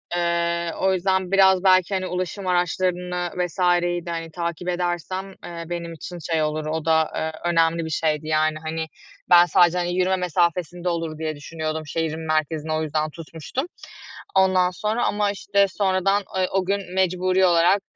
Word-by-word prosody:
Eee, 170 -1 0
o 190 0 +2
yüzden 190 0 0
biraz 190 -1 +5
belki, 185 0 +4
hani, 185 -1 -1
ulaşım 185 +2 -4
araçlarını 180 0 0
vs.yi 175 -1 +1
de, 170 - -6
hani, 165 -1 -5
takip 170 +1 -4
edersem, 180 +2 -2 0.2
eee, 170 -1 -6
benim 170 -1 -4
için 175 +2 -8
şey 160 -1 +2
olur, 155 0 -2
o 155 +1 -3
da, 160 -1 +2
eee, 160 - -2 0.2
önemli 165 0 +2
bir - - -5
şeydi. 155 -1 -1
Yani, 155 0 +2
hani, 160 0 -2 0.4
ben 175 0 +8
sadece, 175 +1 +4
hani, 175 0 -1
yürüme 185 +1 +2
mesafesinde 175 0 0
olur 165 -2 -3
diye 155 -1 -3
düşünüyordum 155 +1 -4
şehrin 160 +1 -3
merkezini, 155 0 -1
o 155 0 0
yüzden 155 0 -1
tutmuştum. 165 - -6 0.7
Ondan 185 -1 +4
sonra 215 +5 -1
ama, 205 -1 +1
işte, 200 0 +1
sonradan, 195 +1 +1
eee, 185 -1 +2
o 190 -1 0
gün 195 -1 -2
mecburi 185 0 +2
olarak, 175 +3 +4
175 Hz, 165 wpm, -23 LUFS, 160-185 Hz, 0.7 s, ben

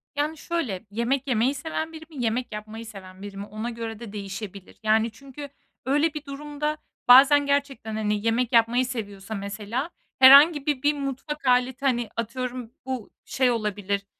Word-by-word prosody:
Yani, 300 +2 -1
şöyle, 280 - -3
yemek 245 +5 -1
yemeyi 250 +2 +2
seven 320 +3 -4
biri 320 0 -9
mi, 285 -6 -5
yemek 240 +2 -1
yapmayı 215 +2 -7
seven 190 -3 -11
biri 200 -1 -8
mi, 200 - -5
ona 215 +3 -5
göre 230 -2 -6
de 230 -4 -9
değişebilir. 200 -1 -7
Yani, 220 +1 +2
çünkü 275 +4 -10 0.4
öyle 295 +4 +2
bir 300 -2 -7
durumda 295 +2 -4 0.3
bazen 280 +3 +8
gerçekten, 280 -6 -1
hani, 210 -1 -1
yemek 235 +2 +1
yapmayı 235 +2 +4
seviyorsa 215 -4 -6
mesela 205 +8 -4 0.3
herhangi 280 +3 +8
bir, 290 -4 0
bir 295 +1 +4
mutfak 280 +1 -5
aleti, 250 +1 +2
hani, 240 -4 +1
atıyorum, 245 +1 -4
bu 260 -5 -4 0.2
şey 260 -2 +2
olabilir, 205 -3 -2
245 Hz, 160 wpm, -25 LUFS, 215-280 Hz, 0.4 s, bazen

